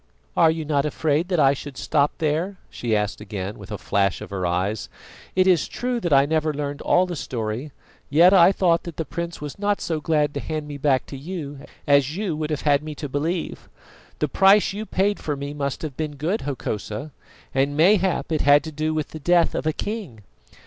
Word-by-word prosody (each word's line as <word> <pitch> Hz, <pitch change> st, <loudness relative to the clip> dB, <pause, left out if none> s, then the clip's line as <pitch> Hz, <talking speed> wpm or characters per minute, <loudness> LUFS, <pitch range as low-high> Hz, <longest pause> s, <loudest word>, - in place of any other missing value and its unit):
"Are 165 Hz, -, +5 dB
you 160 Hz, -1 st, -2 dB
not 145 Hz, -2 st, +1 dB
afraid 150 Hz, +2 st, 0 dB
that 180 Hz, -3 st, 0 dB
I 135 Hz, -2 st, +5 dB
should 140 Hz, -1 st, -8 dB
stop 145 Hz, +1 st, +2 dB
there?" 165 Hz, +5 st, -1 dB
she 115 Hz, -3 st, -1 dB
asked 105 Hz, 0 st, -1 dB
again, 100 Hz, -1 st, -5 dB
with -, -, -11 dB
a -, -, -3 dB
flash 100 Hz, -2 st, 0 dB
of -, -, -9 dB
her 95 Hz, -2 st, -1 dB
eyes. 95 Hz, +4 st, -1 dB, 0.5 s
"It 185 Hz, 0 st, +4 dB
is 180 Hz, -5 st, +3 dB
true 245 Hz, 0 st, -2 dB
that 175 Hz, -7 st, -2 dB
I 140 Hz, 0 st, +6 dB
never 155 Hz, +1 st, +1 dB
learned 145 Hz, 0 st, -4 dB
all 180 Hz, -, +3 dB
the 180 Hz, -1 st, -5 dB
story, 120 Hz, +1 st, -4 dB, 0.4 s
yet 170 Hz, +6 st, +6 dB
I 180 Hz, -1 st, +7 dB
thought 175 Hz, -3 st, +2 dB
that 170 Hz, -3 st, -7 dB
the 160 Hz, -, -2 dB
prince 170 Hz, +5 st, -5 dB
was 150 Hz, +5 st, -7 dB
not 205 Hz, 0 st, +1 dB
so 160 Hz, -2 st, -2 dB
glad 150 Hz, -2 st, +1 dB
to 145 Hz, -, -3 dB
hand 155 Hz, 0 st, -4 dB
me 145 Hz, -1 st, -7 dB
back 135 Hz, -2 st, +2 dB
to -, -, -9 dB
you 145 Hz, -1 st, -6 dB, 0.3 s
as 140 Hz, +1 st, +3 dB
you 195 Hz, -6 st, -1 dB
would 155 Hz, 0 st, -3 dB
have 150 Hz, -2 st, -2 dB
had 145 Hz, -1 st, +3 dB
me 155 Hz, 0 st, -7 dB
to 145 Hz, -, -5 dB
believe. 160 Hz, +5 st, -3 dB, 0.5 s
The 150 Hz, -, 0 dB
price 195 Hz, +6 st, +4 dB
you 210 Hz, +2 st, -5 dB
paid 200 Hz, +2 st, +1 dB
for 150 Hz, -, -2 dB
me 140 Hz, +1 st, -5 dB
must 140 Hz, -1 st, -3 dB
have 150 Hz, -4 st, -5 dB
been 155 Hz, -1 st, -4 dB
good, 165 Hz, +10 st, -1 dB
Hokosa, 135 Hz, 0 st, -4 dB, 0.4 s
and 140 Hz, +2 st, +1 dB
mayhap 185 Hz, +1 st, +3 dB
it 155 Hz, -, +1 dB
had 145 Hz, +1 st, +5 dB
to 160 Hz, -, -6 dB
do 155 Hz, +1 st, -2 dB
with 155 Hz, -2 st, -2 dB
the 155 Hz, -, -8 dB
death 175 Hz, +2 st, +3 dB
of -, -, -2 dB
a -, -, +3 dB
king." 190 Hz, -, -5 dB
150 Hz, 220 wpm, -23 LUFS, 140-170 Hz, 0.5 s, I